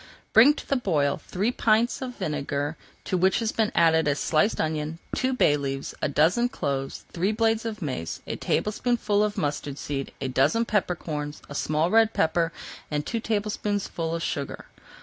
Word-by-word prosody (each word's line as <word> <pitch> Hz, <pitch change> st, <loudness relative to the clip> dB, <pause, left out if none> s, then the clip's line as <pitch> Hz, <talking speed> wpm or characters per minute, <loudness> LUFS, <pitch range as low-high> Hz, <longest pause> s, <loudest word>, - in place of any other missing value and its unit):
Bring 265 Hz, +7 st, +8 dB
to -, -, -9 dB
the 275 Hz, -, +2 dB
boil 155 Hz, -, +1 dB
three 205 Hz, +6 st, 0 dB
pints 230 Hz, +1 st, +2 dB
of 250 Hz, -2 st, -5 dB
vinegar 145 Hz, 0 st, -2 dB, 0.3 s
to 185 Hz, -, -1 dB
which 190 Hz, +2 st, +3 dB
has 225 Hz, -1 st, 0 dB
been 220 Hz, -2 st, +1 dB
added 160 Hz, -2 st, +4 dB
a 145 Hz, -, +2 dB
sliced 155 Hz, +7 st, +1 dB
onion, 155 Hz, 0 st, -1 dB, 0.2 s
two 260 Hz, 0 st, +1 dB
bay 250 Hz, -, +3 dB
leaves, 135 Hz, -1 st, -4 dB
a -, -, +1 dB
dozen 170 Hz, -, +3 dB
cloves, 135 Hz, -, -3 dB
three 185 Hz, +4 st, +1 dB
blades 225 Hz, 0 st, +1 dB
of 215 Hz, -4 st, -4 dB
mace, 105 Hz, -, -4 dB
a -, -, -3 dB
tablespoonful 210 Hz, -1 st, 0 dB
of 210 Hz, -1 st, -1 dB
mustard 145 Hz, -1 st, -2 dB
seed, 140 Hz, -2 st, -4 dB
a 135 Hz, -, -2 dB
dozen 135 Hz, -, +2 dB
pepper 205 Hz, -5 st, +1 dB
corns, 150 Hz, -3 st, -5 dB
a -, -, -7 dB
small 155 Hz, +4 st, 0 dB
red 225 Hz, 0 st, +5 dB
pepper, 165 Hz, +1 st, +2 dB, 0.4 s
and 150 Hz, -1 st, -2 dB
two 230 Hz, -, -2 dB
tablespoonfuls 205 Hz, -6 st, -2 dB
of 165 Hz, -, -3 dB
sugar. 140 Hz, -1 st, -4 dB
170 Hz, 175 wpm, -26 LUFS, 145-220 Hz, 0.4 s, Bring